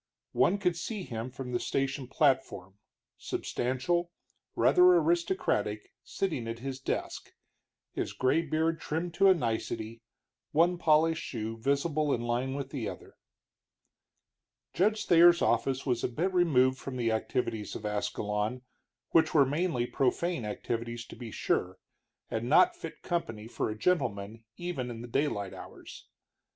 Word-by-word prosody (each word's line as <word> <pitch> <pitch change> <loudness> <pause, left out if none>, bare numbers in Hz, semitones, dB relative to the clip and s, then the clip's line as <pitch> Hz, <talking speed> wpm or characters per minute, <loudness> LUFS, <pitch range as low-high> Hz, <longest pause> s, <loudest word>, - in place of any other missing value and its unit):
One 200 - +3
could 180 -4 0
see 205 +4 -4
him 115 -4 -5
from 125 0 -7
the 120 - 0
station 135 -1 -2
platform, 130 - 0 0.4
substantial, 150 +8 -1 0.4
rather 180 - +5
aristocratic, 165 - 0
sitting 140 -6 -3
at 115 0 -4
his 135 +2 -5
desk, 135 - -4 0.6
his - - -3
gray 130 +6 +2
beard 160 +1 0
trimmed 165 +3 -3
to 195 - +4
a 190 - +7
nicety, 115 -4 -3 0.5
one 170 +3 +3
polished 160 0 +3
shoe 115 -2 -4
visible 140 +5 0
in 120 - -5
line 120 +3 -1
with 140 -1 -5
the 130 -6 -3
door. - - -8 1.6
Judge 215 +4 +1
Thayer's 170 0 +6
office 135 -1 +1
was 125 -4 0
a - - +2
bit 170 +10 -2
removed 130 -7 +3
from 135 -2 -6
the 115 -2 +1
activities 110 -1 -2
of 105 - -6
Ascalon, 105 +3 -2 0.5
which 160 -1 +3
were 140 -3 +7
mainly 150 -2 0
profane 135 +2 0
activities, 115 +2 -4
to - - -11
be 120 -2 -8
sure, 95 -3 -1 0.5
and 115 +2 -3
not 350 - +5
fit 350 - -9
company 115 -11 -3
for 115 - -2
a 110 - -5
gentleman 115 - -1
even 175 -8 -4
in 115 -1 -7
the - - -7
daylight 115 -6 -1
hours. - - -11
130 Hz, 140 wpm, -30 LUFS, 115-165 Hz, 1.6 s, a